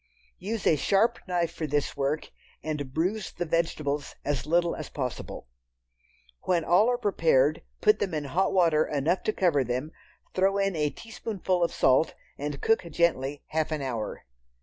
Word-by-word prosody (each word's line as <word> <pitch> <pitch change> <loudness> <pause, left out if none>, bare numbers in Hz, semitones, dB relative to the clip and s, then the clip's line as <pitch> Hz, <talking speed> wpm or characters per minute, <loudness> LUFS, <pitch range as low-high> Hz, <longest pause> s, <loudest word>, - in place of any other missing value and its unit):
Use 210 +3 -4
a 160 - +5
sharp 225 - +2
knife 175 -2 0
for 155 - -3
this 145 0 -1
work 140 +2 -1 0.3
and 150 -4 -3
bruise 185 +8 -1
the 175 - -3
vegetables 155 -3 -1
as 145 -1 -1
little 170 +1 +2
as 155 - -7
possible. 125 - -5 1.0
When 170 -3 +1
all 190 +7 +5
are 245 - +1
prepared, 160 - +2 0.2
put 210 0 +4
them 185 -5 -1
in 150 - -1
hot 180 +8 +1
water 165 -5 +4
enough 155 +6 0
to - - +2
cover 170 -9 +2
them, 125 +5 -3 0.4
throw 195 +1 +2
in 195 -2 +1
a 150 -2 +1
teaspoonful 190 -1 -2
of 170 - +1
salt 130 +5 +3 0.2
and 145 -1 -5
cook 225 - +3
gently 145 -4 0
half 160 0 -1
an 155 -3 -2
hour. 120 -5 -4
165 Hz, 165 wpm, -27 LUFS, 145-185 Hz, 1.0 s, a